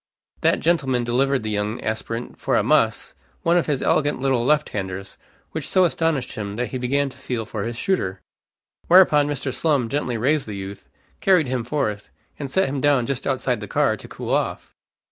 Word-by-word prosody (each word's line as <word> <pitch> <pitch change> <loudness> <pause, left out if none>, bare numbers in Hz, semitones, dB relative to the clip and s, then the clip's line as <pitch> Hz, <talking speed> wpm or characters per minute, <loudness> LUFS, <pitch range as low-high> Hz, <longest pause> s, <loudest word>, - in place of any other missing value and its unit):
That - - +2
gentleman 135 -7 +1
delivered 130 +2 +1
the 110 - -2
young 105 +2 -2
aspirant 115 +2 -4
for - - 0
a - - +3
muss - - +2 0.3
one 170 +1 +3
of 175 - +2
his 145 -4 0
elegant 145 -2 +2
little 130 -3 +1
left 150 +3 +2
handers, 95 -1 -5 0.4
which - - -5
so 185 - +4
astonished 165 -6 0
him 100 -1 -5
that 125 +2 -2
he 130 - -4
began 140 +3 0
to 130 - -15
feel 125 -4 -3
for 110 -1 -5
his 120 0 -4
shooter. 100 - -1 0.7
Whereupon 170 -5 +6
Mr. 140 -2 -3
Slum 140 -8 +1
gently 130 -3 -1
raised 140 +5 +1
the 105 - -5
youth, 95 0 -8 0.3
carried 180 -8 +3
him 125 -2 -1
forth, 110 -6 -2 0.3
and 140 -2 -4
set 190 +8 +2
him 135 0 -3
down 145 -4 +3
just 135 0 -3
outside 135 -2 0
the - - -7
car - - +2
to - - -11
cool - - -6
off. - - -1
130 Hz, 195 wpm, -23 LUFS, 115-145 Hz, 0.7 s, Whereupon